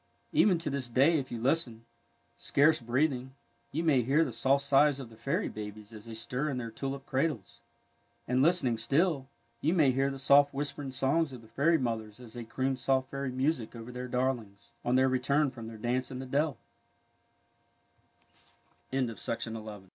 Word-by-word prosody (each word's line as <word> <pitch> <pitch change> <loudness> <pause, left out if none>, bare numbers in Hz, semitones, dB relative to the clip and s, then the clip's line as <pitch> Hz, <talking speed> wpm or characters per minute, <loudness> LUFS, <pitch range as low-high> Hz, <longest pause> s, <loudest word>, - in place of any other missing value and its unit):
Even 190 -4 +5
to 165 -3 -3
this 135 -3 -3
day, 140 +7 +4
if 130 - -6
you 120 - -4
listen, 120 -3 0 0.5
scarce 150 +3 +3
breath 130 +7 +2
ing, 130 +1 -7 0.4
you 160 +4 -1
may 145 -6 +4
hear 140 +7 +3
the 130 - -5
soft 135 +4 +2
sighs 140 0 +4
of 125 -4 -8
the - - -13
fairy 135 +5 -1
babies 105 +1 -8
as 110 0 -10
they 115 -1 -8
stir 125 +6 -2
in 135 - -2
their 115 -2 -4
tulip 135 +3 -5
cradles, 135 - -2 0.7
and, 125 +1 +2
listening 135 -8 +2
still, 140 +3 +1 0.3
you 160 +5 +2
may 150 -6 +5
hear 135 +2 +1
the 135 - -5
soft 140 +1 +5
whisper 145 +1 -3
ing 135 -2 -5
songs 140 +4 +1
of 120 -2 -10
the - - -15
fairy 155 +8 +3
mothers 115 -4 -3
as 120 -3 -12
they 120 -1 -6
croon 130 +4 -1
soft 130 0 0
fairy 140 -1 -3
music 130 -2 -1
over 115 +1 -8
their 125 0 -5
darlings, 125 -5 -2
on 120 - +1
their 130 0 +5
return 135 +3 +2
from 115 -3 -8
130 Hz, 165 wpm, -30 LUFS, 120-140 Hz, 0.7 s, Even